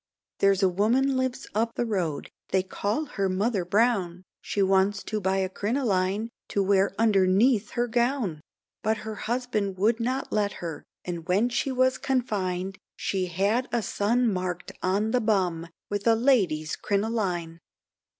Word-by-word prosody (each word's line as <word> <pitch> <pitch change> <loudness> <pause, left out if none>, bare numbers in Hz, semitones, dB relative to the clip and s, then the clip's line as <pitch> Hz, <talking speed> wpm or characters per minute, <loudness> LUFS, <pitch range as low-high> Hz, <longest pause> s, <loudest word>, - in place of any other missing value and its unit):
There's 195 0 +3
a - - +6
woman 235 +9 +2
lives 260 -1 -1
up 225 +2 0
road, 185 -11 -2 0.2
they 190 -1 +2
call 205 +9 -2
her 195 -8 -2
mother, 195 -1 0 0.7
She 200 - 0
wants 195 +1 +2
to 215 -1 -3
buy 190 0 +1
a 190 -1 +1
crinoline, 205 -1 0 0.2
to 200 - 0
wear 195 0 +2
underneath 210 +1 +3
her 240 0 +2
gown? 235 - 0 0.4
But 220 +1 +1
her 220 - -4
husband 215 -4 -2
would 220 +5 +2
not 255 +3 -2
let 205 -1 +1
her, 165 -3 -6 0.2
and 170 -2 -5
when 200 +7 +2
she 255 +3 -1
was 255 0 +2
confined, 195 -8 -1 0.2
She 185 -2 -1
had 200 +8 0
a 235 -1 0
son 235 +6 +1
mark'd 180 -3 -2
on 200 +4 +1
the 250 - +2
bum, 185 -6 0 0.2
with 205 +2 -2
a 225 - +6
lady's 195 - +2
crinoline! 195 -6 -1
205 Hz, 150 wpm, -26 LUFS, 185-235 Hz, 0.7 s, a